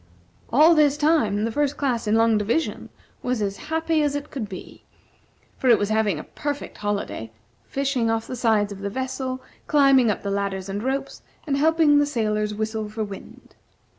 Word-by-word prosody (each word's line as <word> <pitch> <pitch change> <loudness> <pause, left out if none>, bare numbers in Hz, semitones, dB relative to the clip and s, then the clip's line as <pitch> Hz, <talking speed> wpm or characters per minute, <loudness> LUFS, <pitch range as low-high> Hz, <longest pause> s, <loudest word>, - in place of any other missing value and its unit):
All 310 +7 +7
this 295 -2 +4
time, 265 -10 +2
the 230 - -1
First 290 +3 0
Class 245 -6 -1
in 210 - +3
Long 225 0 +4
Division 220 +10 -1 0.3
was 250 -2 -1
as 200 -1 -2
happy 320 0 +1
as 290 -1 0
it 290 0 -5
could 230 -8 -5
be, 185 - -10 0.8
for 260 - +2
it 235 - +7
was 205 - -1
having 215 -5 +1
a 150 - -6
perfect 290 -1 -5
holiday; 205 - -3 0.3
fishing 270 -4 -1
off 225 0 0
the - - -5
sides 220 -4 +2
of 200 - -7
the 200 0 -3
vessel, 260 +2 -4 0.2
climbing 275 -5 +5
up 210 - -2
the 200 - -2
ladders 195 -1 -2
and 200 +1 -3
ropes, 270 +3 -3 0.2
and 285 -3 0
helping 305 0 +4
the 290 - +2
sailors 215 -5 -1
whistle 220 0 -3
for 215 +1 -3
wind. 200 -2 -10
230 Hz, 185 wpm, -24 LUFS, 210-285 Hz, 0.8 s, All